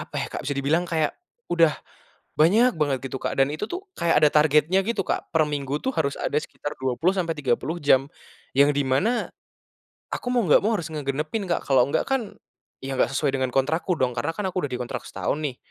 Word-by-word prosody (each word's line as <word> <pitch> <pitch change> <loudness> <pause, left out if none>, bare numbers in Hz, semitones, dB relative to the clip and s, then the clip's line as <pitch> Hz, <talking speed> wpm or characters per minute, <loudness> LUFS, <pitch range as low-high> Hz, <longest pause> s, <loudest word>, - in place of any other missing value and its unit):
apa - - -8
ya, - - -2
Kak. - - -4
Bisa 145 - -1
dibilang 155 +6 +1
kayak 160 -3 0 0.4
udah 165 -3 +4 0.6
banyak 215 +11 +5
banget, 140 -3 +1
gitu 135 - -3
Kak, - - -3
dan 135 - +4
itu 155 - -3
tuh, 370 +2 -5
kayak 165 -3 +3
ada - - +7
targetnya 155 +4 +4
gitu 230 -4 0
Kak. - - -2
Per 160 -1 +4
minggu 140 -1 -2
tuh, 265 - 0
harus 140 - +1
ada 145 - -1
sekitar 145 -1 -7
20 130 +8 +1
sampai 170 -3 0
30 140 +4 -1
jam, 135 -1 +4 0.5
yang 140 +1 +6
di 145 -1 0
mana 205 - +1 0.8
aku 245 - -3
mau 245 - +3
enggak 150 - +5
mau 225 +1 +2
harus 165 - -5
ngegenepin 150 +7 -3
Kak. - - -1
Kalau 130 -3 +5
enggak 140 - 0
kan 255 -6 -2 0.4
ya, 135 0 -4
enggak - - +3
sesuai 140 -2 0
dengan 130 -1 -1
kontrakku 160 +6 0
dong. 125 -2 +1
Karena - - -1
kan, 205 - -2
aku 185 -3 -2
udah 145 - -3
dikontrak 125 -1 -4
setahun - - -2
nih, 135 -4 -3
150 Hz, 210 wpm, -24 LUFS, 135-180 Hz, 0.8 s, ada